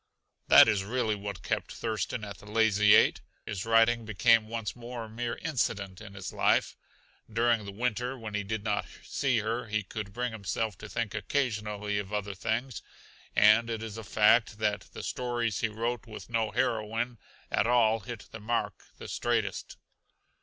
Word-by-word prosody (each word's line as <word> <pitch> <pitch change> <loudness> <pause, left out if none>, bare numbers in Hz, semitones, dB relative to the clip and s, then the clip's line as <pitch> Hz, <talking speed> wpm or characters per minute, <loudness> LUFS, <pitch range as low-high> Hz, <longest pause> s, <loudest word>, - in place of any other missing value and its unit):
That - - +9
is 100 -2 +2
really 110 +1 0
what 100 -2 -6
kept - - -2
Thurston 110 0 -3
at 100 -2 -8
the 105 - -14
Lazy 105 -1 +5
Eight. - - +4 0.2
His 100 0 -4
writing 115 +1 +4
became 110 +1 +3
once 115 -1 -4
more 120 -1 -7
a - - -8
mere 115 +1 -3
incident 100 - -2
in 100 - -11
his 95 -1 -6
life. - - +2 0.6
During 115 -1 +2
the 100 - -6
winter, 125 +4 -2
when 110 -3 -7
he 105 - 0
did 105 +1 -4
not 105 -2 -1 0.2
see 130 -3 0
her, 115 +2 -2
he 105 -1 -1
could 100 +1 -6
bring 125 +3 -2
himself 110 0 -2
to 110 - -9
think 115 -2 -2
occasionally 105 -6 -1
of 100 -1 -6
other 105 -1 -2
things; 115 +5 -2 0.5
and 110 +3 +6
it 115 -1 -3
is 110 -2 -6
a 115 - -7
fact 105 +3 +4
that 105 -1 -1
the - - -8
stories 120 -3 -1
he 115 - 0
wrote 115 +2 -3
with 110 +1 -10
no 115 -1 +1
heroine 115 0 -1 0.3
at 105 - +2
all 115 -2 +4
hit 110 +1 -8
the 110 - -8
mark 115 +3 -2
the - - -9
straightest. - - -2
110 Hz, 175 wpm, -29 LUFS, 105-120 Hz, 0.6 s, That